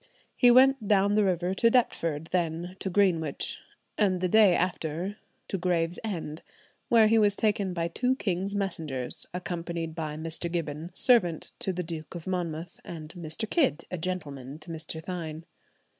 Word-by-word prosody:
He 245 - +6
went 260 -2 +6
down 200 0 +4
the 210 0 +4
river 180 -1 +1
to 230 +4 +4
Deptford, 165 - +1
then 175 0 -1
to 190 - -3
Greenwich, 175 -6 +1 0.4
and 190 -4 +3
the 185 - +1
day 205 -1 +6
after 175 +2 -2 0.3
to 195 - -3
Gravesend, 170 -1 -2 0.5
where 230 -2 +6
he 225 +1 +5
was 205 -2 +4
taken 205 -3 +1
by 170 -1 -1
two 250 +9 0
king's 195 -3 -2
messengers, 160 -10 -3
accompanied 170 -2 -4
by 155 -2 -4
"Mr. 165 +2 -1
Gibbons, 165 +1 -4
servant 180 -11 +3
to 230 -6 -1
the 180 0 -3
Duke 160 0 -7
of 170 - -7
Monmouth, 175 -2 -3
and 160 -2 -8
Mr. 175 +4 -4
Kidd, 255 - +2 0.2
gentleman 145 -7 -4
to 165 +2 -8
Mr. 160 0 -5
Thynne." 165 -3 -5
175 Hz, 155 wpm, -28 LUFS, 160-200 Hz, 0.5 s, He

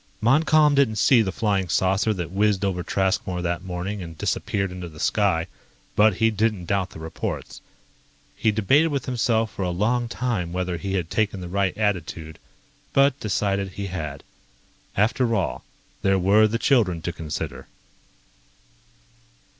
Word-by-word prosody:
Montcalm 150 +5 +4
didn't 135 -6 +3
see 120 +3 +5
the 95 -3 -1
flying 100 -3 0
saucer 95 +5 +2
that 90 -5 -4
whizzed 100 0 +1
over 90 -2 -1
Traskmore 95 -1 -1
that 85 +1 -2
morning 95 +2 -4
and 80 -2 -8
disappeared 100 +3 -1
into 90 -1 -7
the 75 -1 -14
sky, 95 -5 +1 0.5
but 105 -1 +5
he 115 +2 +2
didn't 110 -4 0
doubt 95 +1 0
the - - -11
reports. 80 0 -5 0.7
He 110 - +2
debated 130 +10 +3
with 140 -4 -2
himself 115 -4 0
for - - -6
a 90 - 0
long 115 +7 0
time 115 -10 -2
whether 90 -1 -2
he 95 +2 -4
had 90 -2 -2
taken 105 -3 0
the 90 - -6
right 100 0 0
attitude, 85 -6 -2 0.5
but 140 0 +4
decided 100 -3 -1
he 100 - -5
had. 75 -5 -5 0.7
After 115 +3 +2
all, 85 - -2 0.4
there 95 0 +3
were 100 +4 +5
the 115 +2 -1
children 105 - +2
to 85 - -3
consider. 80 -3 -5
100 Hz, 155 wpm, -24 LUFS, 90-110 Hz, 0.7 s, see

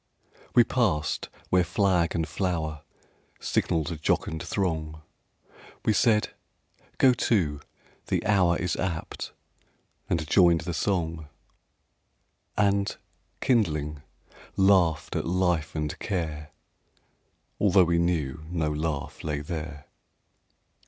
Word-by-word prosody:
WE 120 - +8
passed 95 -12 0 0.2
where 90 -1 +5
flag 90 -4 +1
and 80 -2 0
flower 80 -3 -2 0.6
Signalled 80 +1 0
a 85 - -4
jocund 80 +1 0
throng; 80 -5 -2 0.8
We 110 - +4
said: 105 +1 +3 0.7
"Go 130 -1 +6
to, 90 -11 +1 0.5
the - - -1
hour 90 -5 +3
Is 90 -2 -1
apt!"—and 85 -1 -6
joined 85 -2 +5
the 85 0 -4
song; 85 -4 -1 1.3
And, 100 -1 +2 0.4
kindling, 75 - +1 0.6
laughed 95 -5 +3
at - - -1
life 90 -3 0
and 75 -1 -3
care, 80 -6 -3 1.1
Although 95 -2 +5
we 85 0 +2
knew 80 -5 -1
no 80 -3 -1
laugh 75 -1 -3
lay 75 -2 -2
there. 75 -2 -6
85 Hz, 100 wpm, -27 LUFS, 80-95 Hz, 1.3 s, WE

